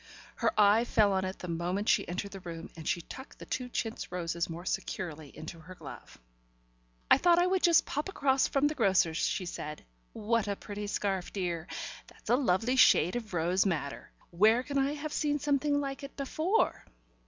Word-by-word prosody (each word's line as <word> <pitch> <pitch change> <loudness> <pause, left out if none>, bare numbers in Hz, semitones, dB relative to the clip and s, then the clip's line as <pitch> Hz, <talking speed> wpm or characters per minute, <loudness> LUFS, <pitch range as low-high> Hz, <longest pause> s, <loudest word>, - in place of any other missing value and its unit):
Her - - +2
eye 210 +2 +6
fell 210 -4 +3
on 190 0 0
it 185 +1 -4
the 180 - -7
moment 175 +5 -2
she 215 -7 +3
entered 190 +3 -4
the 195 - -8
room, 170 -2 -8
and 160 -1 -8
she 175 - 0
tucked 265 +10 -11
the - - -10
two 250 -1 -3
chintz 225 -4 -4
roses 170 -1 -2
more 170 +2 -7
securely 160 -6 -4
into 165 +1 -8
her 180 +4 -12
glove. - - -11 0.9
"I - - +8
thought 345 -1 +5
I 350 - +4
would 370 0 +1
just 340 -2 +5
pop 295 +6 -3
across 275 -7 +2
from 275 +1 +1
the 295 - +2
grocer's," 190 - +2
she 185 - 0
said. 150 -3 -6 0.3
"What 220 0 0
a 200 - -1
pretty 205 +1 -6
scarf, 195 -3 -2
dear! 175 -3 -3 0.4
That's - - -7
a - - +6
lovely 245 0 +1
shade 180 -7 +5
of 220 -6 -4
rose 175 +3 +2
madder. 155 -7 -3 0.2
Where 215 +7 +4
can 280 0 -1
I 275 +2 +1
have 300 +1 -5
seen 295 -1 +1
something 290 0 +1
like 275 -1 -4
it 275 0 -10
before?" 315 +9 0
205 Hz, 195 wpm, -30 LUFS, 175-275 Hz, 0.9 s, I